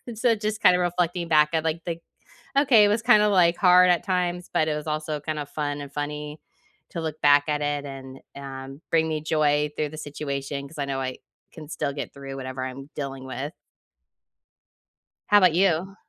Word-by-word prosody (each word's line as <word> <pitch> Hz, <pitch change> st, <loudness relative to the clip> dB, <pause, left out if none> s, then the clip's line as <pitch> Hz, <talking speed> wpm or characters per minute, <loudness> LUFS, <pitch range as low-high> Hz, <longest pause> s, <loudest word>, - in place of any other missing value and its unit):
so 230 Hz, +1 st, +2 dB
just 215 Hz, 0 st, -3 dB
kinda 180 Hz, 0 st, +5 dB
reflecting 175 Hz, -1 st, -1 dB
back 150 Hz, -1 st, +5 dB
at, 160 Hz, -, +1 dB
like, 165 Hz, +1 st, -2 dB
the 170 Hz, -1 st, -3 dB, 0.6 s
okay, 255 Hz, -7 st, +6 dB
it -, -, +4 dB
was 215 Hz, +2 st, +1 dB
kinda 210 Hz, -3 st, +5 dB
like, 175 Hz, -4 st, +4 dB
hard 180 Hz, -1 st, +6 dB
at 175 Hz, -, +2 dB
times, 180 Hz, -1 st, -1 dB
but 155 Hz, -, +2 dB
it 150 Hz, -, 0 dB
was 150 Hz, -, -6 dB
also 155 Hz, -1 st, -3 dB
kinda 150 Hz, -1 st, -4 dB
fun 145 Hz, 0 st, -4 dB
and 140 Hz, -1 st, -8 dB
funny 150 Hz, +1 st, -5 dB, 0.5 s
to 170 Hz, -, -4 dB
look 155 Hz, -1 st, -5 dB
back 145 Hz, 0 st, +6 dB
at 150 Hz, 0 st, 0 dB
it 145 Hz, -1 st, -1 dB
and, 135 Hz, -1 st, -9 dB, 0.2 s
um, 135 Hz, 0 st, -8 dB
bring 160 Hz, -1 st, +2 dB
me 155 Hz, -1 st, -2 dB
joy 150 Hz, -1 st, +1 dB
through 150 Hz, -, -1 dB
the 155 Hz, -, -9 dB
situation, 140 Hz, -1 st, -5 dB
'cause 150 Hz, +1 st, -14 dB
I 140 Hz, -, -1 dB
know 135 Hz, -1 st, -2 dB
I 130 Hz, -1 st, -4 dB, 0.3 s
can 155 Hz, -2 st, -11 dB
still 140 Hz, -3 st, -3 dB
get 140 Hz, -, -6 dB
through 135 Hz, -1 st, -8 dB
whatever 130 Hz, -1 st, -5 dB
I'm 135 Hz, +2 st, -8 dB
dealing 135 Hz, -2 st, -5 dB
with. 135 Hz, +3 st, -5 dB, 1.8 s
How 205 Hz, 0 st, +6 dB
'bout 180 Hz, -4 st, +5 dB
you? 185 Hz, +1 st, +1 dB
150 Hz, 195 wpm, -25 LUFS, 140-175 Hz, 1.8 s, okay